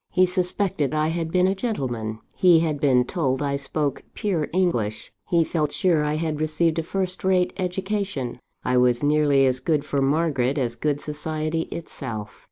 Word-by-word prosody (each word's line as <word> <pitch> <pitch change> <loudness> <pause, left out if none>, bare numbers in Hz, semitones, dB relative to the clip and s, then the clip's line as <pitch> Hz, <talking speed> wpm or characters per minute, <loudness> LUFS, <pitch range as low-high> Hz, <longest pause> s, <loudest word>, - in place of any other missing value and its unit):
He 185 0 +4
suspected 180 -4 -1
I 155 +1 +1
had 165 -1 -2
been 180 +1 +3
a 190 - +3
gentleman; 125 - -3
he 175 -3 +5
had 155 -3 -1
been 130 -4 +4
told 135 -4 -1
I 140 -1 0
spoke 140 0 -1
pure 175 -8 -1
English; 120 - -1 0.2
he 170 -2 +4
felt 155 -2 -1
sure 170 -5 +2
I 150 0 0
had 155 -1 -2
received 155 +1 +1
a - - +1
first 185 +2 -3
rate 185 -1 +2
education 190 - -2 0.3
I 125 0 +2
was 125 +1 +3
nearly 145 -2 +4
as 130 -1 +1
good 150 +1 0
for 140 -2 -1
Margaret 140 -2 +1
as 120 -4 0
good 145 +4 -1
society 155 +1 -2
itself! 115 -10 -7
155 Hz, 175 wpm, -24 LUFS, 135-175 Hz, 0.3 s, he